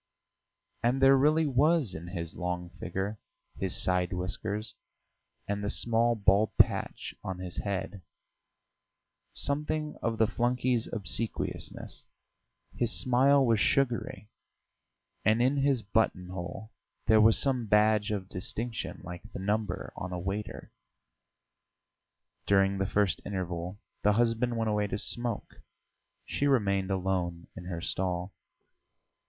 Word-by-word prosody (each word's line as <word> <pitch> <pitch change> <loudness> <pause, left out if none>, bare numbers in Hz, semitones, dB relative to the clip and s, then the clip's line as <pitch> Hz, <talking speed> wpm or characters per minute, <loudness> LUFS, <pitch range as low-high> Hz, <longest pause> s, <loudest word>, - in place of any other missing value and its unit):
And 125 +3 +2
there 135 0 +7
really 155 +4 +4
was 145 - +3
in 85 0 -7
his 85 -2 -5
long 90 -1 -4
figure, 95 +4 -4 0.4
his 95 -2 0
side 90 -1 +1
whiskers, 100 +4 -3 0.7
and 100 0 -2
the 100 - -1
small 115 +1 +2
bald 100 0 +2
patch - - +2
on 95 -1 -4
his 90 -1 -5
head, 100 -1 -3 1.3
something 150 +1 0
of 115 -1 -1
the 110 - +4
flunkey's 120 +1 0
obsequiousness; 115 +1 -2 0.7
his 120 -1 +1
smile 135 +2 +4
was 115 -3 +3
sugary, 115 -5 0 0.9
and 110 +2 +3
in 130 +4 +3
his 135 -4 +2
buttonhole 95 -1 -2 0.3
there 110 -1 +6
was 110 +1 +6
some 130 -5 +1
badge 105 +1 +4
of 100 -3 -3
distinction 110 +6 -3
like 90 -1 -7
the - - -5
number 105 +2 -2
on 90 - -5
a 90 - -3
waiter. 95 +4 -5 1.8
During 95 0 +3
the 95 - +1
first 100 -1 +1
interval 90 -1 -4 0.2
the 105 - +4
husband 120 +1 +1
went 110 -1 0
away 105 0 +1
to 100 - -3
smoke; 120 +1 -3 0.6
she 145 - 0
remained 100 -8 +2
alone 90 -3 -1
in 90 - -8
her 85 -2 -4
stall. 90 +1 -2
105 Hz, 125 wpm, -29 LUFS, 95-120 Hz, 1.8 s, there